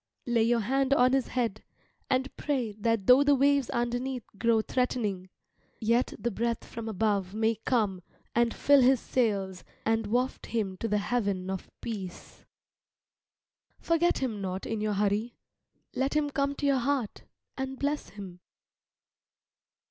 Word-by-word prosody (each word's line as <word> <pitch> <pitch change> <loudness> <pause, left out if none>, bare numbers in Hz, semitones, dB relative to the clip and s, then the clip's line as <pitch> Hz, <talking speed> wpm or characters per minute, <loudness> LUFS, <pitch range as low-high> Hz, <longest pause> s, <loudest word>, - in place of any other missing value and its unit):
Lay 240 -2 +2
your 230 +1 +3
hand 270 +4 +2
on 255 0 +4
his 270 -2 +2
head, 230 -4 -2 0.5
and 260 0 0
pray 260 -7 -1
that 230 -2 +1
though 250 +5 +7
the 285 0 +4
waves 280 -1 +3
underneath 245 +1 -2
grow 230 -1 +3
threatening, 215 -8 -1 0.5
yet 230 +3 +1
the 240 - -2
breath 235 +3 -2
from 225 -1 -6
above 200 -2 0
may 220 +1 +2
come 210 -7 +1 0.3
and 235 0 +3
fill 285 +2 +4
his 255 0 +5
sails 200 -8 -1 0.2
and 225 -1 +1
waft 250 +4 -1
him 210 -5 -2
to 230 - -3
the 210 -1 +1
haven 200 -4 -1
of 190 - -5
peace. 195 -6 -7 1.3
Forget 335 +1 +2
him 225 -6 -2
not 190 0 -4
in 225 -1 -3
your 215 -1 0
hurry, 210 +3 0 0.6
let 270 +3 -1
him 295 -1 +1
come 280 0 0
to 290 - -3
your 275 -2 +3
heart 255 -3 -2 0.3
and 265 0 -4
bless 290 +2 -2
him. 195 -3 -10
235 Hz, 150 wpm, -29 LUFS, 210-265 Hz, 1.3 s, though